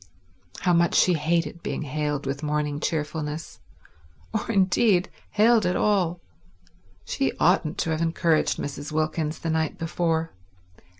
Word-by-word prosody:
How 180 - +3
much 170 0 +3
she 180 - +5
hated 165 +2 0
being - - -3
hailed 150 0 -2
with 135 +1 -3
morning 150 -1 -1
cheerfulness—or 150 - -5
indeed, 190 -1 +3 0.2
hailed 220 +1 +4
at 180 0 +1
all. 180 -5 +1 0.9
She - - -1
oughtn't 155 +1 +2
to 165 - -1
have 160 0 -1
encouraged 165 -1 +1
Mrs. 145 +1 -5
Wilkins 155 0 -1
the 165 - -3
night 160 -1 -1
before. 165 0 -1
160 Hz, 125 wpm, -25 LUFS, 150-175 Hz, 0.9 s, she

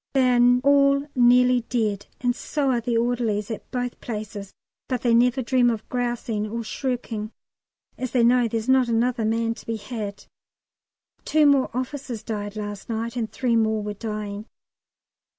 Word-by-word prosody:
They 260 -1 +4
are 245 +1 +5
all 280 0 +4
nearly 250 0 +5
dead, 210 -4 -1
and 245 -1 +1
so 280 0 -1
are 240 -2 +1
the 235 0 0
orderlies 230 -3 0
at 220 - -7
both 245 -1 -4
places; 210 -3 -6 0.4
but 250 -3 -2
they 240 -2 +3
never 250 +2 +3
dream 245 0 +3
of 225 -2 -3
grousing 240 -3 -2
or 230 +2 -4
shirking, 230 -2 -4 0.7
as 255 - -2
they 245 -1 +2
know 245 0 +4
there's 225 +1 -3
not 260 -1 +4
another 235 0 +1
man 230 +1 0
to - - -14
be 225 0 -2
had. 210 -2 -6 1.0
Two 310 -1 +3
more 280 -2 +4
officers 255 -2 -4
died 205 -2 -4
last 205 -1 -6
night, 230 +1 -3
and 230 -3 -3
three 245 -3 0
more 220 -1 +1
were 210 0 -4
dying. 210 0 -5
235 Hz, 165 wpm, -24 LUFS, 220-250 Hz, 1.0 s, are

